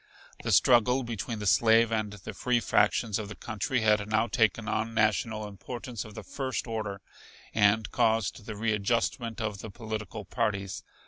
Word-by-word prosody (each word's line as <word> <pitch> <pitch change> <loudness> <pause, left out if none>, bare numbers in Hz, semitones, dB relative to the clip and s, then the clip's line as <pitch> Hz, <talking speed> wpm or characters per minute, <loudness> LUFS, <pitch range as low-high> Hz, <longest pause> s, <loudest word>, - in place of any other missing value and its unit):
The - - -2
struggle 125 +1 +5
between 115 -1 -4
the 105 - -5
slave 115 +3 +5
and 110 -2 -1
the 100 -3 -8
free 125 -1 +1
factions 105 0 +2
of 105 -2 -5
the 105 - -7
country 120 +3 -2
had 105 -1 +2
now 110 +1 +3
taken 115 -1 +1
on 110 +2 -1
national 110 0 +1
importance 120 +4 -6
of 110 -2 -12
the - - -7
first 130 -2 -3
order, 110 -4 -4 0.5
and 105 +1 +3
caused 110 -3 +1
the 110 - -5
readjustment 115 +2 0
of 105 -3 -3
the 110 - -7
political 110 -1 -6
parties. 100 +1 -2
110 Hz, 165 wpm, -29 LUFS, 105-115 Hz, 0.5 s, struggle